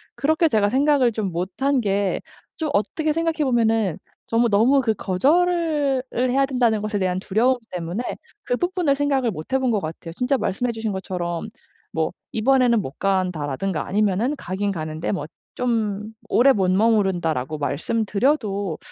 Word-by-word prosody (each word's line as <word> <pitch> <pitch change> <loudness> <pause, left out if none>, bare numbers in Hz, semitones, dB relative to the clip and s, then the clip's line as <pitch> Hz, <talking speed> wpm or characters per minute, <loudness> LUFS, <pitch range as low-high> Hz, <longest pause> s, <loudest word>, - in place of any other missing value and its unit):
그렇게 315 +3 +2
제가 215 -8 +2
생각을 270 0 +3
좀 210 -4 -3
못한 195 +11 0
게 200 -2 0 0.3
좀 315 -2 -2
어떻게 300 +10 0
생각해 330 -1 0
보면은 225 - +2 0.3
정말 230 +1 +2
너무 240 +7 +4
그 225 -3 +1
거절을 295 - +1
을 250 +1 +1
해야 275 +2 +3
된다는 245 -5 +1
것에 215 -1 -2
대한 185 -1 0
두려움 225 +7 +2
때문에 180 +5 -3 0.4
그 245 - -1
부분을 355 -4 +1
생각을 275 -4 +1
못해본 250 +10 -1
것 215 - +1
같아요. 165 -1 -7
진짜 250 - 0
말씀해 245 +2 -1
주신 225 -1 -3
것처럼 180 -1 -4 0.4
뭐 160 -1 -1 0.2
"이번에는 245 0 +3
못 130 - -8
간다."라든가 180 -3 -1
아니면은 210 +7 +1
가기는 195 +1 -2
가는데 155 -2 -3
뭐 185 -7 -2 0.3
좀 220 -3 -1 0.2
"오래 265 +3 +5
못 190 -4 +1
머무른다."라고 185 - +1
말씀드려도 205 - 0
220 Hz, 340 characters per minute, -22 LUFS, 190-265 Hz, 0.4 s, 오래